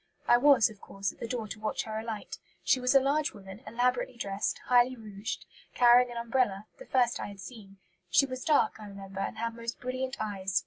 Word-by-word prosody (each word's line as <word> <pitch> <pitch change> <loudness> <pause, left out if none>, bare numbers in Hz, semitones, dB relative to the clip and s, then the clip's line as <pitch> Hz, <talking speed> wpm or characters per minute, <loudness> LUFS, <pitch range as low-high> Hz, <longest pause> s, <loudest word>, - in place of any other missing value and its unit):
I - - +7
was, 275 -2 +6
of 210 - -16
course, 195 -1 -4
at - - -24
the - - -4
door 235 -3 -3
to 215 - -7
watch 215 - -2
her 220 0 -4
alight. 220 -2 -6 0.2
She 260 - +3
was 250 +2 +1
a - - +9
large 285 +3 +1
woman, 195 +1 -11
elaborately 245 +2 0
dressed, 200 -2 -2
highly 250 +1 +4
rouged, 215 0 -6 0.3
carrying 245 0 +6
an 240 - -7
umbrella, 235 -4 0
the - - -11
first 245 -2 +2
I - - -4
had 200 -1 -10
seen. 200 -3 -11 0.3
She 280 - +5
was 255 -1 -6
dark, 300 -6 +2
I 210 - -9
remember, 195 -1 -9
and - - -3
had 230 0 -2
most 230 0 -6
brilliant 255 +1 -3
eyes. 195 -3 -1
230 Hz, 215 wpm, -30 LUFS, 205-250 Hz, 0.3 s, a